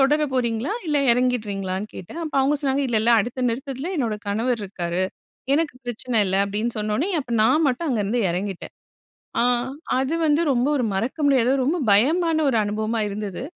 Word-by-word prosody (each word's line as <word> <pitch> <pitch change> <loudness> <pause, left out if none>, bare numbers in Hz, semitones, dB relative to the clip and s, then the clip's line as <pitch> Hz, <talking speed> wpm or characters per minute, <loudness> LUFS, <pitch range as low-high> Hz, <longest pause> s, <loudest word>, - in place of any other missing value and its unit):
தொடர 295 +3 +3
போறீங்களா, 240 - 0
இல்ல 300 -1 +1 0.2
எறங்கிடுறீங்களா?"ன்னு 210 -6 -1
கேட்டேன். 315 - -8
அப்ப 310 - -6
அவுங்க 285 +3 +2
சொன்னாங்க, 275 -1 0
"இல்ல 235 -3 +1
இல்ல, 235 - +3
அடுத்த 245 +3 -3
நிறுத்தத்துல 270 +7 -4
என்னோட 230 -6 -1
கணவர் 225 +4 0
இருக்காரு; 180 -1 -2 0.5
எனக்கு 310 -3 0
பிரச்சன 240 -1 -1
இல்ல," 190 +1 +1
அப்டின்னு 215 +4 -3
சொன்னோன்னே. 215 - -1
அப்ப 255 - -10
நான் 300 +8 +3
மட்டும் 275 +5 0
அங்கருந்து 230 -1 0
எறங்கிட்டேன்! 190 +1 -4 0.7
அ, - - +4 0.6
அது 270 +5 0
வந்து 300 +1 +3
ரொம்ப 245 +1 +1
ஒரு 250 - 0
மறக்க 230 +10 -2
முடியாத, 260 -3 +3
ரொம்ப 310 +6 +1
பயமான 315 - +3
ஒரு 245 - +1
அனுபவமா 215 +2 -1
இருந்தது. 205 0 -5
240 Hz, 165 wpm, -23 LUFS, 210-275 Hz, 0.7 s, அ